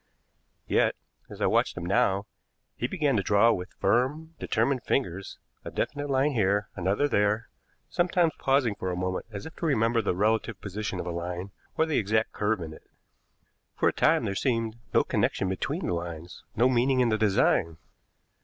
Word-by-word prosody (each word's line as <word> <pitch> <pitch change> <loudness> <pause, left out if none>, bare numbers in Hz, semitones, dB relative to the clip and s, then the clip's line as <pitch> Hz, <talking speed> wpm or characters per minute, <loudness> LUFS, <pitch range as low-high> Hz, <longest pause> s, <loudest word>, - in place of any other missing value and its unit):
Yet, - - +2 0.3
as - - -10
I - - +3
watched - - +2
him 85 - -4
now, 95 +2 +2 0.5
he 120 - -2
began 150 -4 0
to - - +2
draw 105 +4 +4
with 90 -3 -3
firm, 150 +7 0
determined 125 +3 0
fingers 95 -7 -2 0.3
a - - -6
definite 145 0 -3
line 135 +2 +2
here, 105 -4 +1
another 100 +10 +1
there, 105 -2 +1 0.4
sometimes 175 -2 +1
pausing 135 -5 +2
for 95 -2 -4
a 90 - -2
moment 90 +3 -3
as 100 -2 -7
if 160 - -9
to 170 - -2
remember 115 -4 +2
the 100 -4 -1
relative 110 +1 0
position 100 -1 -4
of - - -4
a 90 - -3
line 90 +3 -4 0.3
or 160 - +4
the 160 -2 +1
exact 110 +1 +1
curve 105 -2 -1
in 80 -1 -6
it. - - -16 0.9
For - - +3
a - - -4
time - - +3
there 100 - -1
seemed 115 +1 -1 0.2
no - - +4
connection 95 - 0
between 95 0 -2
the - - -1
lines, 85 0 -6
no 120 +3 +4
meaning 130 +1 +2
in 125 -2 +3
the 110 - +2
design. 95 -5 +2
110 Hz, 180 wpm, -27 LUFS, 95-130 Hz, 0.9 s, draw